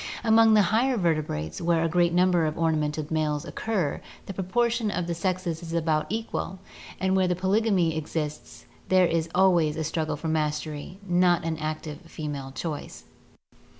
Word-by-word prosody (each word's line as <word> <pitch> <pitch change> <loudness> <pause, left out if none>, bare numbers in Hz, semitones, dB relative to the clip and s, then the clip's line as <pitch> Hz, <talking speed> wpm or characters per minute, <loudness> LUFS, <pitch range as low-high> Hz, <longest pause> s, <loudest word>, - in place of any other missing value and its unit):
Among 225 -1 +6
the 210 - +6
higher 250 +3 +3
vertebrates^ 155 - -1
where 165 -1 +2
a - - +2
great 175 +1 +2
number 175 -2 +3
of 155 - -3
ornamented 155 -2 0
males 150 -2 0
occur, 195 -10 -2 0.2
the 195 - -6
proportion 230 +4 0
of 180 -3 -2
the 170 - -2
sexes 180 -1 -2
is 165 -1 -7
about 160 -2 +1
equal, 220 -3 -3 0.4
and 190 0 +1
where 190 -1 +3
polygamy 190 -3 +2
exists 150 -5 -5 0.2
there 185 -1 +5
is 165 -1 0
always 175 -5 +3
a 160 - -1
struggle 155 -1 -2
for 155 +3 -6
mastery, 155 +1 -2
not 175 -1 +3
an 160 -1 -2
active 155 -1 -4
female 145 -4 -5
choice. 150 +1 -6
165 Hz, 155 wpm, -26 LUFS, 155-185 Hz, 0.4 s, Among